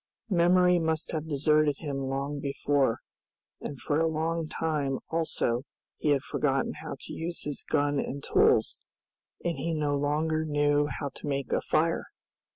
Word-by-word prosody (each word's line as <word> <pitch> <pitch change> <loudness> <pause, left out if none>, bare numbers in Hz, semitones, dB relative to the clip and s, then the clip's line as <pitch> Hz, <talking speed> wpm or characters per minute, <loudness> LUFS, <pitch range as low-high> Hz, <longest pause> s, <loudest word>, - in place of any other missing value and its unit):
Memory 180 0 +5
must 160 -1 -1
have 155 -1 -3
deserted 150 0 +3
him 145 -3 -4
long 135 +2 -2
before, 140 -3 +1 0.6
and 140 - -6
for 145 +1 0
a 165 - +3
long 160 +1 -1
time 145 -4 -1
also 155 -7 0 0.4
he 150 - 0
had 140 -2 +3
forgotten 135 -2 0
how - - -5
to - - -7
use 170 +1 -3
his 145 -1 -3
gun 145 -1 +1
and 140 +1 -4
tools, 445 +3 +3 0.7
and 170 -1 -1
he 165 -1 -1
no 150 -2 0
longer 155 +2 0
knew 145 -1 +2
how 140 +1 -4
to - - -8
make 140 -3 -2
a - - +2
fire! - - +1
150 Hz, 160 wpm, -28 LUFS, 140-160 Hz, 0.7 s, Memory